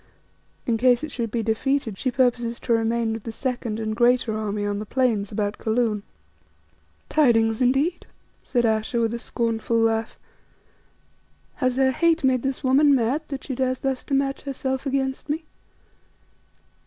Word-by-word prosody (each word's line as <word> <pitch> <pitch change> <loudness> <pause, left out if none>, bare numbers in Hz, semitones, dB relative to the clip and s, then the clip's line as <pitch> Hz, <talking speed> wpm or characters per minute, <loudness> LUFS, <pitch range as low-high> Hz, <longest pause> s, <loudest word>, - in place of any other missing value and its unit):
In 235 -3 +1
case 250 +2 +4
it 310 - -4
should 235 -4 -3
be 230 +1 -2
defeated 225 +1 0
she 255 - -1
purposes 240 -2 +1
to 235 - 0
remain 225 0 +1
with 225 - -5
the 225 - -6
second 240 -2 -3
and 215 -1 -2
greater 240 -1 +3
army 210 -1 -2
on 205 0 -2
the 215 - -5
plains 230 -6 0
about 205 -1 -2
Kaloon." 220 -2 0 1.1
"Tidings 225 -6 +3
indeed," 275 +8 +1 0.4
said 240 -2 0
Ayesha 220 +3 0
with 230 -1 +1
a 235 - -3
scornful 230 -1 -1
laugh. 225 0 +1 1.4
"Has 255 -2 +1
her 265 0 +3
hate 330 +4 +2
made 260 -2 +3
this 270 +2 -3
woman 275 +2 +5
mad 255 +5 +1
that 275 -2 -6
she 270 - -4
dares 255 0 0
thus 265 -1 -2
to 275 - 0
match 275 0 0
herself 265 0 -3
against 265 +1 -2
me? 315 +3 -1
245 Hz, 160 wpm, -24 LUFS, 225-265 Hz, 1.4 s, woman